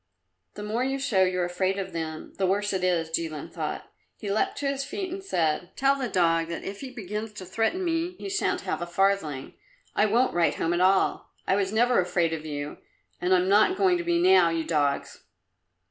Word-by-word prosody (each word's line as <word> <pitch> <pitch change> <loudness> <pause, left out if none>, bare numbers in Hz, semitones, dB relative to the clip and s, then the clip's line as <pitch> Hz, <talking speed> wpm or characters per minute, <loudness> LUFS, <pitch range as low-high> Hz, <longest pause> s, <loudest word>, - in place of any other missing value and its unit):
"The 210 - -6
more 220 +4 -1
you 270 +1 -1
show 225 -8 +1
you're 185 -1 +2
afraid 185 +2 -1
of 190 -2 -4
them, 160 -1 -5
the 190 - +2
worse 205 +2 0
it 185 -1 -1
is," 170 -3 +1
Jilin 160 -2 -3
thought. - - -4 0.3
He 205 -3 -4
leapt 210 - 0
to 285 - -2
his 275 0 -1
feet 375 +5 -4
and 385 +1 -6
said, 175 - 0
"Tell 275 +1 +3
the 260 -3 -3
dog 165 -3 +2
that 170 0 -5
if 200 +1 -6
he 270 - -6
begins 215 -2 -5
to 195 -3 -8
threaten 225 - -1
me, 335 +1 -1
he - - -7
shan't 400 +1 0
have - - -3
a 175 - -3
farthing! 175 -7 0 0.4
I 210 - +4
won't 240 +5 +2
write 170 -1 +2
home 165 - 0
at 175 - +1
all! 190 +1 +2 0.2
I - - +2
was 195 -1 0
never 240 +3 +3
afraid 175 -2 +1
of 160 -1 -5
you, 145 0 -5 0.4
and 180 - 0
I'm 185 0 +4
not 210 - +4
going 370 -2 +3
to - - -2
be 345 0 +1
now, 370 - +6
you 165 -1 -1
dogs!" 145 -3 -1
195 Hz, 215 wpm, -26 LUFS, 170-255 Hz, 0.4 s, now